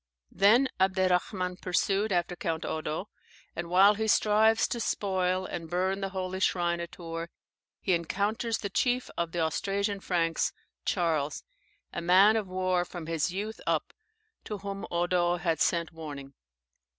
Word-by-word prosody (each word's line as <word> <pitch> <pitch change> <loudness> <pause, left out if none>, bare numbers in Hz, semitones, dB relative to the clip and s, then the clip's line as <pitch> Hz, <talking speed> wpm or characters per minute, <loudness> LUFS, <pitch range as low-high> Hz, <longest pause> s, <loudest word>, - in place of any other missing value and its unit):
Then 230 +7 +5
Abderrahman 185 0 +1
pursued 195 +4 +1
after 175 0 0
Count 165 -2 -3
Eudo, 155 +3 -3 0.5
and 170 0 -4
while 195 +4 +6
he 220 +1 -2
strives 220 +1 +4
to 240 - -2
spoil 185 -4 0
and 165 -3 -6
burn 190 +3 0
the 195 - -2
holy 190 -1 -4
shrine 175 -3 +1
at 170 0 -6
Tours, 165 -1 -6 0.5
he 190 - +1
encounters 205 +7 0
the 200 - -5
chief 250 +3 0
of 170 -1 -2
the 175 - -1
Austrasian 200 +5 -1
Franks, 170 -3 0 0.3
Charles, 160 -5 0 0.5
a - - -3
man 190 +5 +6
of 215 -3 -1
war 185 -1 0
from 175 -2 -8
his 165 +1 -1
youth 210 +4 -4
up, - - 0 0.5
to 210 - -5
whom 200 0 -6
Eudo 175 0 +1
had 170 -2 -1
sent 170 -2 +1
warning. 145 -4 -8
185 Hz, 150 wpm, -29 LUFS, 170-200 Hz, 0.5 s, while